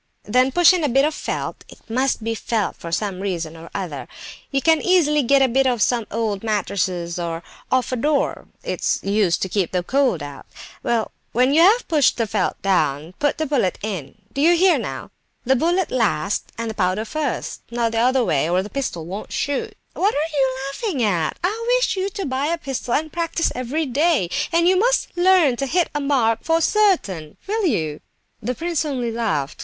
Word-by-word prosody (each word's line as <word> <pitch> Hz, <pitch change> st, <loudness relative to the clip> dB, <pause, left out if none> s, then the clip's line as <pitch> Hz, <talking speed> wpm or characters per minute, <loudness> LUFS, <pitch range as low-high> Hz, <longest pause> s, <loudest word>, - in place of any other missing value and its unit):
Then 255 Hz, +5 st, +2 dB
push 350 Hz, +4 st, +6 dB
in 355 Hz, -3 st, 0 dB
a 295 Hz, -, +2 dB
bit 270 Hz, +3 st, +4 dB
of 310 Hz, -, 0 dB
felt -, -, -4 dB
(it -, -, -16 dB
must 255 Hz, 0 st, 0 dB
be 225 Hz, +1 st, -1 dB
felt, 225 Hz, -1 st, -2 dB
for 170 Hz, -, -8 dB
some 195 Hz, +1 st, -2 dB
reason 170 Hz, -5 st, -3 dB
or 165 Hz, +1 st, -11 dB
other); 170 Hz, -8 st, -4 dB, 0.4 s
you 275 Hz, -, +1 dB
can 320 Hz, +1 st, +3 dB
easily 310 Hz, -5 st, +3 dB
get 275 Hz, +1 st, +4 dB
a -, -, +4 dB
bit 265 Hz, +2 st, +2 dB
off 245 Hz, -2 st, +1 dB
some 235 Hz, -3 st, 0 dB
old 215 Hz, -2 st, -2 dB
mattress, 185 Hz, -5 st, -1 dB
or 170 Hz, -1 st, -4 dB, 0.3 s
off 255 Hz, -1 st, +1 dB
a -, -, 0 dB
door; 290 Hz, +4 st, 0 dB, 0.2 s
it's -, -, -1 dB
used 200 Hz, -3 st, +1 dB
to -, -, -1 dB
keep 190 Hz, -3 st, 0 dB
the 180 Hz, -1 st, 0 dB
cold 255 Hz, -, +1 dB
out. 145 Hz, -1 st, -9 dB, 0.3 s
Well, 230 Hz, -2 st, 0 dB, 0.2 s
when 255 Hz, +4 st, +3 dB
you 320 Hz, -, +5 dB
have 425 Hz, +8 st, +5 dB
pushed 300 Hz, -5 st, +3 dB
the 230 Hz, -, +1 dB
felt 205 Hz, -3 st, -1 dB
down, 160 Hz, -4 st, 0 dB
put 290 Hz, -1 st, +1 dB
the 315 Hz, -, -1 dB
bullet 260 Hz, -11 st, 0 dB
in; 185 Hz, -11 st, -5 dB, 0.2 s
do 275 Hz, -, -2 dB
you 340 Hz, +3 st, +5 dB
hear 370 Hz, +1 st, +4 dB
now? -, -, -6 dB, 0.3 s
The 265 Hz, +2 st, +4 dB
bullet 345 Hz, +6 st, +1 dB
last 200 Hz, -6 st, 0 dB
and 230 Hz, 0 st, -3 dB
the -, -, -7 dB
powder 195 Hz, +1 st, 0 dB
first, 295 Hz, +1 st, -3 dB
not 235 Hz, -1 st, 0 dB
the 225 Hz, -, 0 dB
other 250 Hz, +1 st, +3 dB
way, 155 Hz, -2 st, +1 dB
or 180 Hz, +2 st, +2 dB
the 205 Hz, -, -9 dB
pistol 235 Hz, -, -3 dB
won't 190 Hz, +5 st, -7 dB
shoot. 410 Hz, +10 st, -2 dB, 0.2 s
What 405 Hz, +3 st, +1 dB
are 310 Hz, +2 st, -1 dB
you 265 Hz, -2 st, +1 dB
laughing 315 Hz, -, -2 dB
at? 175 Hz, -7 st, 0 dB
I 460 Hz, +6 st, +1 dB
wish -, -, +1 dB
you 380 Hz, +1 st, -1 dB
to 395 Hz, 0 st, -5 dB
buy 270 Hz, +1 st, -1 dB
a 335 Hz, +2 st, 0 dB
pistol 270 Hz, -6 st, -3 dB
and 310 Hz, +1 st, -2 dB
practise 335 Hz, -1 st, 0 dB
every 255 Hz, +6 st, -2 dB
day, 280 Hz, -, +1 dB, 0.2 s
and 335 Hz, +1 st, +3 dB
you 370 Hz, +1 st, +4 dB
must -, -, +1 dB
learn 350 Hz, -8 st, +4 dB
to 275 Hz, -, -2 dB
hit 345 Hz, +5 st, +1 dB
a 295 Hz, -, -1 dB
mark 245 Hz, -6 st, +2 dB
for 325 Hz, 0 st, +2 dB
certain; 325 Hz, -, +1 dB
will 420 Hz, -1 st, 0 dB
you?" 155 Hz, -, -1 dB, 0.4 s
The 250 Hz, +4 st, -2 dB
prince 335 Hz, +1 st, -1 dB
only 255 Hz, -6 st, -2 dB
laughed. 205 Hz, -12 st, -2 dB
255 Hz, 205 wpm, -21 LUFS, 200-315 Hz, 0.4 s, push